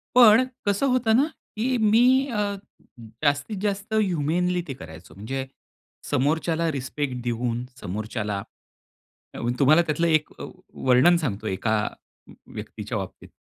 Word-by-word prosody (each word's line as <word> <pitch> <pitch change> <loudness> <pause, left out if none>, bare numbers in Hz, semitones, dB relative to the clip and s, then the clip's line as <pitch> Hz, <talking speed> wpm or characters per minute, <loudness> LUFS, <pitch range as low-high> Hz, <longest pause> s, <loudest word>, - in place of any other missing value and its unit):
पण 235 0 +8 0.2
कसं 200 +7 +2
होतं 245 -3 +2
ना 275 +5 +4 0.3
की 250 +4 0
मी 220 0 +4 0.3
अ, 205 -2 -1 0.7
जास्तीत 145 +8 +1
जास्त 200 +1 -2
ह्युमेनली 180 -2 +1
ते - - -2
करायचो. 80 +1 -11
म्हणजे 130 +7 -4 0.6
समोरच्याला 160 +4 +1
रिस्पेक्ट 135 -1 -3
देऊन 120 0 -2 0.2
समोरच्याला 105 +1 -3 1.2
तुम्हाला 155 +5 +6
त्यातलं 165 +1 0
एक 155 -1 +2
अ, - - -6 0.5
वर्णन 135 +8 +6
सांगतो 110 -3 -3
एका 110 +2 0 0.8
व्यक्तीच्या - - -5
बाबतीत. - - -7
155 Hz, 115 wpm, -24 LUFS, 125-205 Hz, 1.2 s, पण